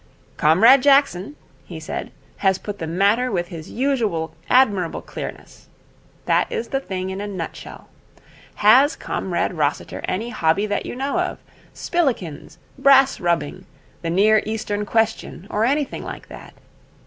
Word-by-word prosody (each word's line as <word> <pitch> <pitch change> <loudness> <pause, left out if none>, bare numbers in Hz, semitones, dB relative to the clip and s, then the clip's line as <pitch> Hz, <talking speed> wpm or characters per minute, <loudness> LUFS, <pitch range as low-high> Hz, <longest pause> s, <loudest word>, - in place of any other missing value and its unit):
'Comrade 225 - +6
Jackson,' 275 -5 +3 0.3
he - - -9
said, - - -5 0.3
'has 190 -2 +2
put 205 +1 -7
the 160 - -4
matter 200 +9 +2
with 175 -3 -2
his 165 -4 -9
usual 225 -12 -1 0.2
admirable 205 -10 +2
clearness. - - -9 0.6
That - - +1
is 465 -1 -3
the 270 - 0
thing 190 -7 -5
in 190 +1 -5
a 205 - -4
nutshell. 185 -5 -7 0.7
Has 255 +8 +5
Comrade - - -2
Rossiter - - -2
any 220 +6 -3
hobby 195 -2 +1
that 205 - -2
you - - -6
know 275 +2 -1
of? - - -2 0.4
Spillikins, 225 - -2 0.2
brass 270 0 +5
rubbing, 170 -5 -2 0.3
the 165 - -3
Near 210 +5 +4
Eastern 210 -1 -3
Question, 225 -4 -1
or 215 +2 +1
anything 285 +2 -1
like - - -8
that? - - -12
210 Hz, 140 wpm, -21 LUFS, 185-265 Hz, 0.7 s, Comrade